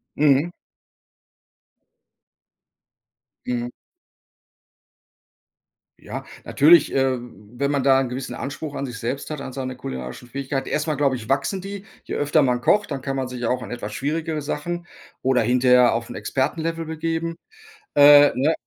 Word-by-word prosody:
Mhm. 145 Hz, +2 st, +3 dB, 3.0 s
Mhm. 120 Hz, -1 st, -2 dB, 2.3 s
Ja. -, -, -7 dB, 0.2 s
Natürlich, 165 Hz, +4 st, +5 dB
äh, 135 Hz, -1 st, +2 dB
wenn 120 Hz, +4 st, -5 dB
man 140 Hz, -2 st, +1 dB
da 135 Hz, 0 st, +5 dB
'nen 130 Hz, -2 st, -1 dB
gewissen 125 Hz, +1 st, -5 dB
Anspruch 140 Hz, +2 st, -6 dB
an 140 Hz, -, -3 dB
sich 120 Hz, -4 st, -7 dB
selbst 135 Hz, +6 st, -4 dB
hat, 150 Hz, -, -4 dB
an 130 Hz, -, -6 dB
seine 130 Hz, -1 st, -4 dB
kulinarischen 65 Hz, -, -7 dB
Fähigkeiten 135 Hz, 0 st, -3 dB
erst 150 Hz, -, -1 dB
mal, 155 Hz, -2 st, -1 dB
glaube 135 Hz, -2 st, +1 dB
ich, 110 Hz, -3 st, -8 dB
wachsen 140 Hz, +8 st, 0 dB
die: 200 Hz, +1 st, -7 dB, 0.2 s
Je -, -, -5 dB
öfter 145 Hz, +1 st, +2 dB
man 125 Hz, -2 st, +1 dB
kocht, 210 Hz, +6 st, +2 dB
dann 135 Hz, -2 st, -3 dB
kann 135 Hz, 0 st, -3 dB
man 130 Hz, -1 st, -2 dB
sich 125 Hz, -1 st, -5 dB
auch 125 Hz, -, -1 dB
an -, -, -9 dB
etwas 110 Hz, -3 st, -5 dB
schwierigere 155 Hz, +3 st, -2 dB
Sachen 175 Hz, +4 st, -4 dB, 0.4 s
oder 130 Hz, -1 st, +3 dB
hinterher 125 Hz, +1 st, +4 dB
auf 115 Hz, 0 st, -4 dB
'n -, -, -7 dB
Expertenlevel 165 Hz, +4 st, -2 dB
begeben. 165 Hz, +1 st, -3 dB, 0.6 s
Äh, 145 Hz, 0 st, +8 dB
ne 145 Hz, +5 st, +2 dB
135 Hz, 150 wpm, -23 LUFS, 125-155 Hz, 3.0 s, Äh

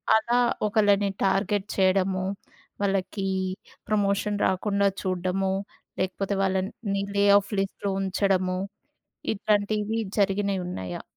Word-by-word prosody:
అలా 235 Hz, +2 st, +2 dB, 0.3 s
ఒకళ్ళని 205 Hz, -1 st, +3 dB, 0.2 s
టార్గెట్ 195 Hz, +1 st, +1 dB
చేయడము, 190 Hz, 0 st, +2 dB, 0.6 s
వాళ్ళకి 195 Hz, 0 st, -1 dB, 0.6 s
ప్రమోషన్ 205 Hz, 0 st, +1 dB
రాకుండా 200 Hz, +2 st, +1 dB
చూడడము, 185 Hz, +1 st, -1 dB, 0.5 s
లేకపోతే 190 Hz, +2 st, -1 dB
వాళ్ళన్ 190 Hz, 0 st, 0 dB, 0.2 s
ని 200 Hz, 0 st, 0 dB
లే 200 Hz, 0 st, +4 dB
ఆఫ్ 205 Hz, +1 st, -2 dB
లిస్ట్‌లో 195 Hz, +1 st, -2 dB
ఉంచడము, 185 Hz, -1 st, +1 dB, 0.8 s
ఇట్లాంటివి 210 Hz, +1 st, 0 dB, 0.2 s
జరిగినవి 200 Hz, -1 st, +1 dB
ఉన్నాయా? 95 Hz, -, -5 dB
195 Hz, 95 wpm, -26 LUFS, 190-205 Hz, 0.8 s, లే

